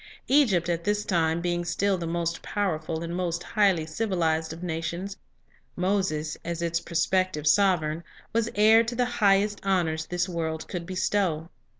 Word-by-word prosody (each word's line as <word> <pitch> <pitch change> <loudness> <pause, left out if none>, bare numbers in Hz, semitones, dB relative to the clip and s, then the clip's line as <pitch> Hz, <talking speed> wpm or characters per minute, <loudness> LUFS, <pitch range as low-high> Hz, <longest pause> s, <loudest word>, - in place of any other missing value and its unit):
Egypt 230 - +4
at 170 -1 -1
this 210 +2 0
time 165 -4 +1
being 175 0 -1
still 195 +3 +1
the 170 -2 -4
most 170 0 -2
powerful 165 -5 -2
and 170 +1 -4
most 175 -1 -2
highly 195 -7 +2
civilized 160 -3 -1
of 165 +2 -8
nations, 170 +3 -3 0.6
Moses, 180 -5 0
as 170 0 -3
its 170 0 0
prospective 185 -2 0
sovereign, 165 -2 +3 0.3
was 230 0 +1
heir 220 +2 +6
to 230 +1 -4
the 245 0 +2
highest 205 -3 +2
honors 170 -5 0
this 180 +1 -1
world 160 -3 -3
could 170 -2 -5
bestow. 185 -3 -1
175 Hz, 155 wpm, -26 LUFS, 165-200 Hz, 0.6 s, heir